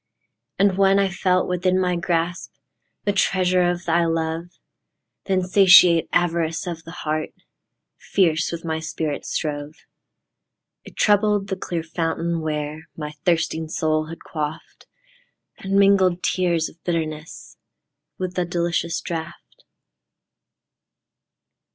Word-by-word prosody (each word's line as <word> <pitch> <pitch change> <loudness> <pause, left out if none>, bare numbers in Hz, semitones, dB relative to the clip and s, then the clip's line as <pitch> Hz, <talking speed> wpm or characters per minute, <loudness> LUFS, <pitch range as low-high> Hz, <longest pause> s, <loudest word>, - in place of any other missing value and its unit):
And 195 -1 +2
when 195 0 +5
I 195 -1 +2
felt 185 -1 +1
within 180 +1 +1
my 180 -1 +1
grasp, 170 +1 -2 0.5
The 205 - +1
treasure 185 -1 +2
of 175 0 -3
thy 170 0 +2
love; 165 0 -1 0.8
The 195 - -1
insatiate 185 -2 +6
avarice 165 -2 0
of 170 -2 -5
the - - -10 0.2
heart 155 0 -1 0.7
Fierce 165 -5 +1
with 170 0 -6
my 160 -1 -2
spirit 160 -2 -4
strove.It 150 0 -9
troubled 205 -1 +2
the 190 - -1
clear 175 -3 -4
fountain 165 0 -2
where 150 0 -4
My 150 -2 -5
thirsting 165 -2 +1
soul 155 -1 0
had 165 +1 -10
quaffed, 150 -1 -6 0.7
And 195 0 -4
mingled 195 -3 +4
tears 170 -3 +1
of 165 - -17
bitterness 160 -2 -4 0.6
With 185 -1 -4
the 180 - 0
delicious 170 -1 -1
draught. 170 -1 -7
170 Hz, 115 wpm, -22 LUFS, 160-185 Hz, 0.8 s, insatiate